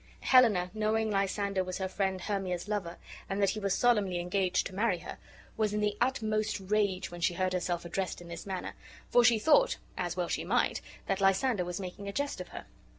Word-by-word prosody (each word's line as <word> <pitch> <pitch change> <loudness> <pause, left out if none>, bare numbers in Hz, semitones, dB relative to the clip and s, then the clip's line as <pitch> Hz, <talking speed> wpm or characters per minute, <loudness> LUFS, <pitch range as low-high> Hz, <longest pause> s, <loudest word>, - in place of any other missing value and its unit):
Helena, 210 -9 +5
knowing 220 0 0
Lysander 195 -1 0
was 185 0 -4
her 190 - -2
friend 190 -1 -1
Hermia's 190 -2 -2
lover, 195 -5 -3 0.3
and 195 - -2
that 200 -1 +3
he 215 - -4
was 195 -2 0
solemnly 210 -7 +2
engaged 180 +1 0
to - - -6
marry 200 -1 +1
her, - - -9 0.4
was 215 -2 +1
in - - 0
the 210 -1 0
utmost 215 -4 0
rage 195 -2 0
when 175 0 -8
she 175 0 +1
heard 185 +1 0
herself 175 -1 -1
addressed 185 +2 -3
in 175 - -11
this 170 +2 -8
manner; 190 -2 -4 0.4
for 245 - +6
she 235 -1 +6
thought 295 +8 +4 0.2
(as - - -2
well - - 0
she - - -2
might) - - +1 0.2
that 195 0 -1
Lysander 195 +2 +3
was 175 +1 -4
making 195 +1 -7
a - - -2
jest 285 +3 -2
of - - -7
her. - - -9
195 Hz, 210 wpm, -31 LUFS, 185-215 Hz, 0.4 s, for